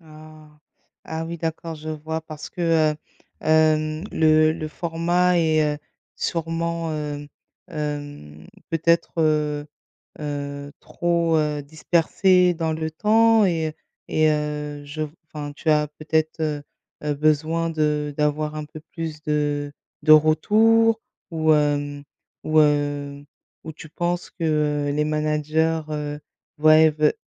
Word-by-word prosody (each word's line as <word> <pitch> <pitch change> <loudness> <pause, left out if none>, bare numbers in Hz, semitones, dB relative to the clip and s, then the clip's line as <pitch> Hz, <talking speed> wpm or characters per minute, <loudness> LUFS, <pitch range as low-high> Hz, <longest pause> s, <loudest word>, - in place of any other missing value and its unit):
Ah! 155 -1 -15 0.6
Ah 160 0 -4
oui 170 +1 -5
d'accord 165 0 -4
je 155 0 -7
vois 160 +1 -4
parce 155 -1 -9
que, 165 -3 +2
heu, - - -9 0.4
hem, 155 0 +2
le 155 0 +4
le 155 -1 -5
format 175 +2 +1
est, 155 -2 +2
heu, 150 - -9 0.4
sûrement, 165 0 -2
heu, 145 -1 -5 0.4
hem, 145 - -6 0.2
peut-être, 170 +1 +1
heu 150 -2 +1 0.5
heu, 145 -1 -5
trop, 170 -1 0
heu, 150 -1 0
dispersé 175 +4 +2
dans 160 -1 -2
le 160 0 -3
temps 220 +5 +4
et 160 -4 0 0.4
et 155 0 +3
heu, 150 -1 -3
je 150 +2 -6
v 150 - -6 0.2
enfin 145 -2 -7
tu 160 - -3
as 150 -1 +3
peut-être, 155 +2 -2
heu 150 -2 -2 0.4
heu, 150 0 0
besoin 155 +3 +1
de 150 -2 -1
d'avoir 150 0 0
un 155 -1 -4
peu 155 +1 -11
plus 160 -2 -5
de 145 -1 -1 0.3
de 155 - +5
retours 220 +9 +5 0.3
ou 160 -1 +3
hem, 145 -1 0 0.4
ou 155 0 +3
heu, 145 -1 0 0.4
ou 160 - -6
tu 160 - -11
penses 175 +2 -2
que, 170 - -7 0.5
heu, - - 0
les 150 +1 0
managers, 155 +1 0
heu, 150 -1 -4 0.4
voient 155 +1 +6
et 160 0 +6
ve 155 0 +2
155 Hz, 135 wpm, -23 LUFS, 150-165 Hz, 0.6 s, voient